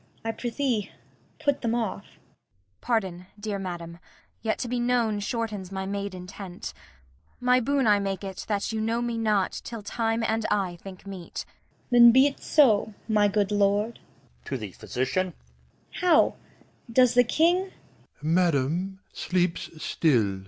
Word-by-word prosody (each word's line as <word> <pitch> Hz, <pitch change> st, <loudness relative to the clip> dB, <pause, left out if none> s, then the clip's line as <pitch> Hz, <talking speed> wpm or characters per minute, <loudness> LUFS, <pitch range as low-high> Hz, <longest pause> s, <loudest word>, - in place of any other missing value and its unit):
I 225 Hz, -, 0 dB
prithee 240 Hz, -3 st, -2 dB, 0.5 s
put 285 Hz, -2 st, +1 dB
them 230 Hz, -1 st, 0 dB
off. 225 Hz, -4 st, -2 dB
Kent. -, -, -23 dB, 0.6 s
Pardon, 190 Hz, -7 st, -1 dB
dear 205 Hz, -1 st, -3 dB
madam. 170 Hz, -2 st, -6 dB, 0.4 s
Yet 220 Hz, -1 st, 0 dB
to 245 Hz, -, -3 dB
be 245 Hz, +1 st, -1 dB
known 240 Hz, -3 st, +1 dB
shortens 210 Hz, -3 st, -3 dB
my 190 Hz, 0 st, -3 dB
made 200 Hz, 0 st, -3 dB
intent. 180 Hz, 0 st, -8 dB, 0.7 s
My 250 Hz, 0 st, +4 dB
boon 275 Hz, +2 st, +1 dB
I 205 Hz, -2 st, +5 dB
make 195 Hz, 0 st, -3 dB
it 190 Hz, -1 st, -6 dB
that 205 Hz, 0 st, -1 dB
you 220 Hz, -1 st, -2 dB
know 230 Hz, +2 st, 0 dB
me 235 Hz, -1 st, -2 dB
not 210 Hz, -4 st, +1 dB
Till 230 Hz, -3 st, -7 dB
time 225 Hz, +2 st, -1 dB
and 225 Hz, 0 st, 0 dB
I 190 Hz, -4 st, 0 dB
think 190 Hz, -1 st, -10 dB
meet. 190 Hz, -3 st, -7 dB
Cor. -, -, -30 dB, 0.4 s
Then 240 Hz, -1 st, +9 dB
be't 270 Hz, +3 st, +4 dB
so, 220 Hz, -8 st, +3 dB
my 210 Hz, -2 st, +4 dB
good 205 Hz, 0 st, +1 dB
lord. 205 Hz, +2 st, +1 dB, 0.5 s
[To 135 Hz, -, -3 dB
the 105 Hz, -5 st, -6 dB
Doctor] 130 Hz, -, -2 dB, 0.6 s
How, 355 Hz, -4 st, +3 dB, 0.6 s
does 250 Hz, 0 st, +5 dB
the 245 Hz, 0 st, +6 dB
King? 345 Hz, +9 st, +2 dB
215 Hz, 140 wpm, -27 LUFS, 195-240 Hz, 0.7 s, Then